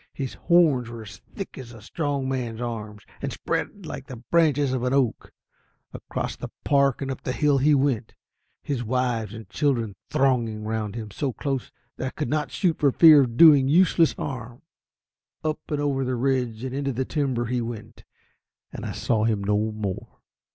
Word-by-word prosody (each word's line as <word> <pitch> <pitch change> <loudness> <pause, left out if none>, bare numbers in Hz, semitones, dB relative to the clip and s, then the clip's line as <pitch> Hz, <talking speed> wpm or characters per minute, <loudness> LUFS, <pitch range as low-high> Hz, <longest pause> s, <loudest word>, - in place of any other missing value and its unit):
His 135 -3 -4
horns 155 -9 +3
were 115 -1 -8
as 100 - -11 0.2
thick 195 -7 -6
as 120 -2 -9
a 115 - -11
strong 140 +1 -2
man's 125 -4 -3
arm, 110 -3 -5 0.2
and - - -3
spread 200 -3 -3
like 135 -3 -7
the 130 - -7
branches 145 +2 +2
of 130 - -1
an 125 +1 0
oak. 130 -5 0 0.6
Across - - -5
the - - -6
park 140 -1 +2
and 135 - -3
up 130 - -6
the 130 - -3
hill 145 -1 +2
he 145 +2 +4
went, 130 -5 0 0.5
his 135 -4 -2
wives 120 -3 -1
and 110 -3 -9
children 115 -1 0 0.2
thronging 120 -5 +1
round 110 -1 -3
him 110 -3 -6
so 135 +5 -2
close 135 -1 -3 0.3
that 130 - -3
I - - -1
could 150 +2 -4
not 150 0 0
shoot 175 -5 0
for 140 -2 +4
fear 155 0 +8
of 120 -3 -2
doing 145 -4 +8
useless 165 +1 +4
harm. 125 -1 -6 0.8
Up 155 -1 -1
and 150 - -1
over 140 -2 0
the 130 0 -1
ridge 125 -3 -1
and 130 -1 -4
into 140 0 -2
the 130 +2 -1
timber 130 -6 -1
he 120 +1 -1
went, 115 -1 -7 0.7
and - - -5
I - - -4
saw 110 -2 0
him 110 -3 0
no 105 +2 +1
more. 105 -3 -4
130 Hz, 185 wpm, -25 LUFS, 115-145 Hz, 0.8 s, fear